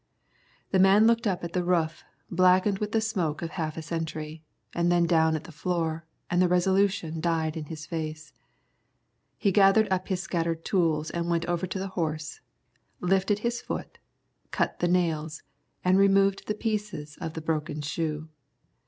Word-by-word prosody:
The 190 - +3
man 195 +3 +6
looked 230 0 +3
up 185 -3 -1
at 170 0 -5
the 180 - 0
roof, 170 -2 0 0.3
blackened 185 +3 +4
with 210 0 -2
the 225 - +2
smoke 175 -9 -1
of 165 - -4
half 160 -4 -3
a 160 - -4
century, 160 -1 -4 0.3
and 170 0 +1
then 175 -1 +4
down 160 -1 +3
at 155 - -4
the - - -11
floor, 165 0 -2 0.2
and 175 +1 +2
the 180 - +5
resolution 180 -2 +1
died 160 -2 0
in 160 -2 -5
his 155 0 -7
face. 155 -2 -5 1.0
He 200 - +2
gathered 200 +3 +5
up 185 0 0
his 190 -2 -1
scattered 165 -3 -2
tools 160 -5 +1
and 170 0 -2
went 170 -1 +1
over 175 +1 -1
to 190 - -4
the 195 +1 -3
horse, 155 -3 -3 0.6
lifted 195 +3 +1
his 240 0 -1
foot, - - -6 0.5
cut - - -1
the 175 - +2
nails, 160 -3 0 0.4
and 185 +1 +5
removed 195 0 +3
the 210 - -1
pieces 210 -9 -3
of 165 -2 -4
broken 155 -1 -2
shoe. 155 +1 -3
170 Hz, 170 wpm, -27 LUFS, 160-190 Hz, 1.0 s, man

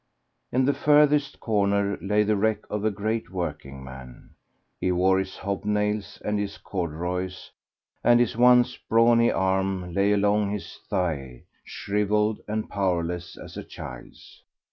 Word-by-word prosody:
In 130 +1 +2
the 140 - +3
furthest 150 -1 +3
corner 100 -2 +1
lay 105 +2 +2
the 105 0 +1
wreck 110 +2 0
of 105 0 -2
a 110 - +3
great 110 +2 -3
working 70 -7 -5
man. 65 -2 -11 0.5
He 90 - 0
wore 95 +1 +3
his 95 0 -5
hob 100 0 -3
nails 105 0 -1
and 105 0 0
his 100 0 -4
corduroys, 90 +1 -4 0.5
and 120 0 +5
his 120 -3 +1
once 125 +1 +5
brawny 115 +1 +5
arm 95 -1 0
lay 100 +2 +2
along 105 0 +2
his 100 -1 -6
thigh, 70 -9 -2 0.2
shrivelled 105 +1 0
and 110 +1 -2
powerless 90 -3 -2
as - - -10
a - - -5
child's. - - -11
100 Hz, 145 wpm, -25 LUFS, 90-110 Hz, 0.5 s, and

